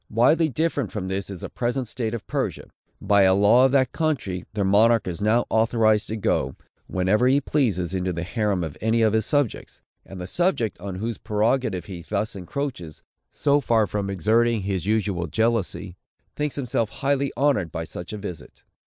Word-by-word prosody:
Widely 150 +9 +3
different 145 - -1
from 95 -3 -4
this 95 +1 -3
is 95 -3 -7
the - - -6
present 125 +1 -2
state 115 0 -3
of 115 - -7
Persia. - - -3 0.3
By 100 -1 +3
a 95 -1 +5
law 105 +6 +5
of 135 - +3
that 130 -2 +3
country, 120 - -2
their 105 - 0
monarch 110 +3 +4
is 90 +1 -4
now 110 +3 +2
authorized 110 -1 +2
to 110 - -3
go, 65 -9 0 0.3
whenever 95 +6 +2
he 135 +2 +4
pleases, 105 - 0
into 95 -1 -1
the 85 0 -4
harem 100 -2 -1
of 80 -3 -6
any 115 +1 +2
of 110 -1 +3
his 110 -1 +1
subjects; 145 -6 -1 0.2
and 95 - -10
the 90 - -5
subject, 135 - 0
on 95 0 -6
whose 110 +3 -4
prerogative 110 -3 0
he 90 -2 -8
thus 105 +5 -3
encroaches, 95 - -5 0.3
so 145 0 +2
far 115 -5 +2
from 100 -1 -3
exerting 110 +4 +2
his 95 -2 -2
usual 100 -5 0
jealousy, 100 -1 -1 0.4
thinks 150 -1 -2
himself 120 -5 -1
highly 140 +2 -1
honored 130 - +1
by 80 - -4
such 85 +2 -8
a 105 - -5
visit. 100 -5 -9
110 Hz, 185 wpm, -24 LUFS, 95-120 Hz, 0.4 s, a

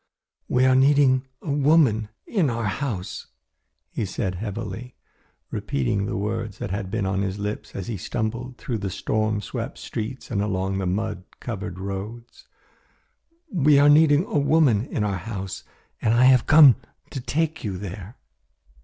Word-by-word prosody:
"We 125 +1 +3
are 130 - +5
needing 135 -1 +4 0.2
a 150 - -3
woman 140 -7 +3 0.2
in 185 - +1
our 115 -1 -2
house," 100 -1 -3 0.6
he - - -2
said 95 -1 -2
heavily, 110 +4 -6 0.6
repeating 95 +10 -1
the - - -2
words 110 0 -3
that 95 - -5
had 100 -1 -3
been 105 0 -1
on 95 0 0
his 95 0 -2
lips 105 +1 -5
as 95 - -4
he 110 -1 -4
stumbled 115 +7 -4
through 115 -4 -3
the 100 0 -3
storm 110 +2 -1
swept - - -5
streets 115 +5 -6
and 100 -3 0
along 95 -1 -1
the 95 - -1
mud 100 0 -2
covered 90 - -5
roads. 100 +5 -7 1.1
"We 150 -4 +5
are 145 +1 +6
needing 150 +2 +5
a 150 - 0
woman 140 -6 +3
in 105 - -2
our 100 -2 -1
house, 95 -1 -6 0.4
and 110 +1 +2
I 120 - +5
have 130 -2 +5
come 150 -7 +8 0.3
to 135 - -4
take 155 +6 -1
you 100 -5 -3
there. 100 +3 -7
110 Hz, 160 wpm, -24 LUFS, 100-130 Hz, 1.1 s, come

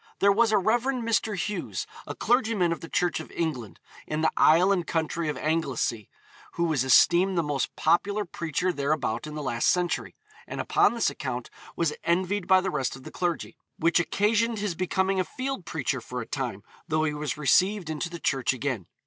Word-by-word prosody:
There 200 - +4
was 225 +2 +3
a 215 - +4
Rev. 220 +5 +2 0.2
Mr. 220 -2 0
Hughes, 205 +3 -3 0.2
a - - -5
clergyman 225 -8 +2
of 165 - -2
the 165 - -9
Church 175 -3 0
of 160 - -8
England, 130 - -3 0.3
in 155 +1 -2
the 160 - +3
isle 175 +5 +5
and 180 -4 0
county 165 0 -1
of 150 - -3
Anglesea, 140 -9 -1 0.4
who 170 - -1
was 155 -6 +1
esteemed 175 +8 +5
the 170 - +2
most 145 -3 -2
popular 200 +6 +1
preacher 170 +1 -2
thereabout 140 -4 -1
in 150 - -7
the 150 - -4
last 120 -3 0
century, 180 -1 0 0.3
and - - -6
upon - - +3
this 235 - +1
account 125 -3 -5 0.2
was 165 -3 0
envied 185 +2 0
by 190 0 +6
the 190 - -2
rest 135 -5 -1
of 135 - -12
the - - -9
clergy, 175 -2 -2 0.2
'which 170 +2 +3
occasioned 220 +5 +1
his 205 -3 -2
becoming 190 +2 0
a - - +3
field 260 -1 -5
preacher 135 -4 -2
for 125 +2 -6
a 115 - -4
time, 120 -8 -4 0.2
though 155 -1 +1
he 150 -1 0
was 150 -3 -3
received 185 +5 +3
into 160 +2 -3
the 170 0 -7
Church 135 -5 +1
again.' 130 -7 -3
170 Hz, 195 wpm, -27 LUFS, 145-190 Hz, 0.4 s, by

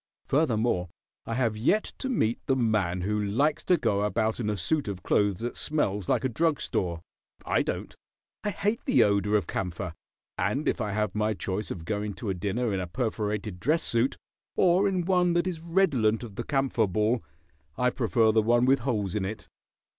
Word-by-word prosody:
Furthermore, 115 - +1 0.4
I 115 - -2
have 115 -3 +1
yet 145 - +2 0.2
to 265 - -3
meet 120 - +1
the 135 - +3
man 105 -8 +1
who 105 +3 0
likes 140 +10 +1
to 180 - +4
go 105 -8 +1
about 110 +2 0
in 110 -3 -1
a 105 - -1
suit 140 - 0
of 95 -2 -5
clothes 100 -1 +1
that 120 +1 -3
smells 105 - -1
like 120 - +2
a - - +3
drug 155 +5 +1
store. 85 -2 -2 0.4
I - - +2
don't. - - -3 0.5
I 210 - 0
hate 205 +3 -1
the 260 - +5
odor 105 +1 +2
of 100 - -2
camphor, 90 -1 -4 0.5
and 105 +11 0
if - - 0
I 105 -2 -2
have 105 -2 0
my 105 0 0
choice 95 +2 -3
of 80 -3 -6
going 105 0 -2
to 105 -5 -3
a - - 0
dinner 105 +5 -1
in 95 - 0
a 90 - -3
perforated 105 -2 -2
dress 155 - +1
suit 115 +3 +1 0.4
or 185 +2 +4
in 185 -3 0
one 180 -2 +3
that 175 +1 +2
is 175 -4 -3
redolent 150 - +2
of 115 -4 -8
the 120 - -5
camphor 135 -5 +1
ball, 110 +4 +1 0.5
I 125 0 +2
prefer 115 -3 +2
the 110 0 +4
one 120 +3 +3
with 135 +1 +4
holes 110 -7 -1
in 105 - -1
it. 105 +3 -5
110 Hz, 200 wpm, -27 LUFS, 100-135 Hz, 0.5 s, the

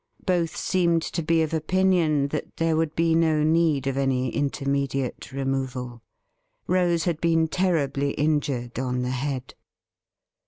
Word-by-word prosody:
Both 175 -3 0
seemed 170 -3 +1
to - - -3
be 165 0 +2
of 160 - -3
opinion 160 -3 +2
that 150 - -5
there 165 -1 +1
would 160 -1 -1
be 165 0 +2
no 160 -2 +3
need 155 -3 +2
of 135 0 -1
any 130 -2 +1
intermediate 140 -2 -2
removal. 130 -3 -3 0.6
Rose 175 -2 +2
had 165 -3 -1
been 165 -1 +3
terribly 150 -6 0
injured 140 -6 -1
on 125 -1 -1
the 125 - -2
head. 130 0 -3
150 Hz, 135 wpm, -25 LUFS, 135-165 Hz, 0.6 s, no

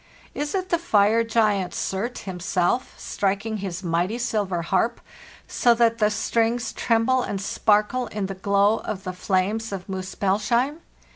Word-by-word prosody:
Is 295 +4 -3
it 370 -1 -2
the 340 -2 +2
fire 220 -6 +3
giant 215 -5 +1
Surt 215 +6 -2
himself, 185 +5 -1
striking 200 +3 -2
his 190 -2 -5
mighty 175 +6 0
silver 205 -7 -1
harp, 195 +7 0 0.5
so 240 -1 +3
that 230 0 +2
the 210 -1 +4
strings 230 +2 0
tremble 235 +3 +2
and 200 -5 -3
sparkle 210 +5 +1
in 210 -2 -3
the 195 - -4
glow 200 +3 +2
of 190 -2 -5
the 185 -1 -4
flames 200 +4 -1
of 190 -2 -6
Muspellsheim? 205 - 0
210 Hz, 145 wpm, -24 LUFS, 190-230 Hz, 0.5 s, the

